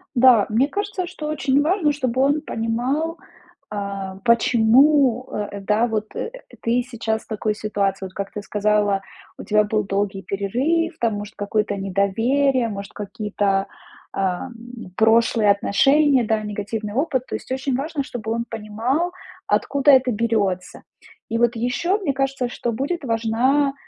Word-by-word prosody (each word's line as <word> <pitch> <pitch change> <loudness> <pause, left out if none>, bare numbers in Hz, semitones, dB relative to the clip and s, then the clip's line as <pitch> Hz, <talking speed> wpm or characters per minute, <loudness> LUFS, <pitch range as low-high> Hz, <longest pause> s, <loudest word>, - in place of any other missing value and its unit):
Да, 240 -4 +6
мне 235 +6 +2
кажется, 405 -2 -3
что 340 -4 -6
очень 285 -2 +1
важно, 320 -1 +2
чтобы 260 -3 -1
он 285 +3 +2
понимал, 265 +7 -2 0.5
а, 200 -2 -5
почему, 245 +3 +4
э, 205 -1 -4
да, 210 +4 +1
вот 215 -1 -2
ты 460 - -3
сейчас 220 -2 -2
в - - -27
такой 215 -1 -1
ситуации. 200 -2 -2
Вот 185 - -9
как 200 0 -5
ты 210 - -5
сказала, 205 -1 +1 0.4
у - - -8
тебя 210 0 +3
был 215 0 0
долгий 195 0 -2
перерыв, 265 - -1
там, 230 -3 +1
может, 205 +1 -7
какое-то 205 0 -1
недоверие, 225 +7 +1
может, 200 -1 -7
какие-то, 205 -2 -1 0.5
ам, 190 +6 -2 0.4
прошлые 225 -1 +4
отношения, 270 +7 +3
да, 220 -1 0
негативный 210 0 -4
опыт. 260 -2 0
То - - -4
есть - - -8
очень 265 0 -1
важно, 290 +2 -2
чтобы 225 -4 -5
он 235 +1 -1
понимал, 230 +10 -1 0.4
откуда 280 0 +3
это 260 -2 +5
берётся. 205 -5 -1 0.5
И 230 - -1
вот 240 0 +2
ещё, 295 - 0
мне 370 -10 -1
кажется, 270 -1 -1
что 240 - -3
будет 285 +8 -3
важна, 250 +4 +1
230 Hz, 145 wpm, -22 LUFS, 210-275 Hz, 0.5 s, Да